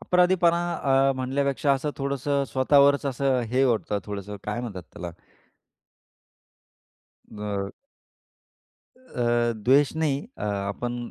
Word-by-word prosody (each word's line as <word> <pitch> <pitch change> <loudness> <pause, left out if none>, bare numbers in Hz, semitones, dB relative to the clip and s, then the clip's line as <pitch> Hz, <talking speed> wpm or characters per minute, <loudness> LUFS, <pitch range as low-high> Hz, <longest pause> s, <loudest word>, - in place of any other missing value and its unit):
अपराधीपणा 180 -1 +3
अ, 135 -1 +2
म्हणल्यापेक्षा 140 +2 0
असं 140 +2 -1
थोडसं 140 0 -1
स्वतःवरच 140 +2 +4
असं 135 -1 +1
हे 130 +2 +2
होत. 115 -4 0
थोडंसं 105 0 -6
काय 105 +3 -3
म्हणतात 100 -7 -6
त्याला? 85 -1 -7 2.2
अ 100 -2 -4 1.2
अ, 120 - 0
द्वेष 135 +6 +3
नाही. 150 -4 0 0.2
अ, - - -9
आपण 105 +4 -3
130 Hz, 105 wpm, -25 LUFS, 110-140 Hz, 2.2 s, स्वतःवरच